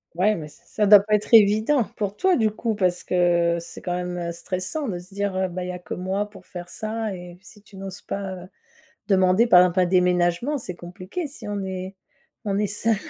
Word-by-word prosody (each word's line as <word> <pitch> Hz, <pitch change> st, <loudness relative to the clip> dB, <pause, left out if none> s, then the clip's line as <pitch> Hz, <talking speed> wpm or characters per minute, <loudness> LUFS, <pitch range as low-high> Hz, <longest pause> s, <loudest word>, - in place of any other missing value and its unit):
Ouais 210 Hz, +5 st, +3 dB
mais 155 Hz, -, -6 dB
s 150 Hz, -, -16 dB
ça 210 Hz, -, 0 dB
doit 205 Hz, 0 st, +9 dB
pas 210 Hz, +1 st, +1 dB
être 210 Hz, +3 st, -3 dB
évident 220 Hz, +5 st, +5 dB
pour 205 Hz, -1 st, -3 dB
toi, 375 Hz, -, +3 dB
du 220 Hz, -3 st, +3 dB
coup. 220 Hz, +1 st, -3 dB
Parce 180 Hz, -3 st, 0 dB
que 175 Hz, -1 st, +2 dB
c'est 170 Hz, -, -10 dB
quand 175 Hz, -, -3 dB
même, 180 Hz, 0 st, -3 dB
heu, 170 Hz, -1 st, -3 dB
stressant 185 Hz, -, -4 dB
de 190 Hz, -5 st, -3 dB
se 180 Hz, +2 st, -15 dB
dire, 200 Hz, -1 st, -2 dB
heu: 190 Hz, 0 st, +1 dB
«Bah 180 Hz, +1 st, -5 dB
y 180 Hz, -, -4 dB
a 180 Hz, -, -6 dB
que 175 Hz, -, -7 dB
moi 190 Hz, +3 st, -2 dB
pour 205 Hz, -, -15 dB
faire 175 Hz, -1 st, -9 dB
ça» 220 Hz, +1 st, -4 dB
et 175 Hz, -1 st, -10 dB
si 210 Hz, +1 st, -16 dB
tu 200 Hz, -1 st, -16 dB
n'oses 195 Hz, 0 st, -7 dB
pas, 195 Hz, -1 st, -4 dB
heu, -, -, -12 dB, 0.6 s
demander, 190 Hz, +3 st, +4 dB
par 180 Hz, -6 st, +8 dB
exemple, 180 Hz, 0 st, +3 dB
un 180 Hz, -, +4 dB
déménagement, 180 Hz, -, +2 dB
c'est 185 Hz, -8 st, -7 dB
compliqué 185 Hz, -, -6 dB
si 280 Hz, -, -10 dB
on 205 Hz, -1 st, -3 dB
est 190 Hz, 0 st, -5 dB, 0.5 s
on 200 Hz, -1 st, 0 dB
est 210 Hz, 0 st, +1 dB
seul 215 Hz, +3 st, +1 dB
190 Hz, 230 wpm, -24 LUFS, 180-210 Hz, 0.6 s, doit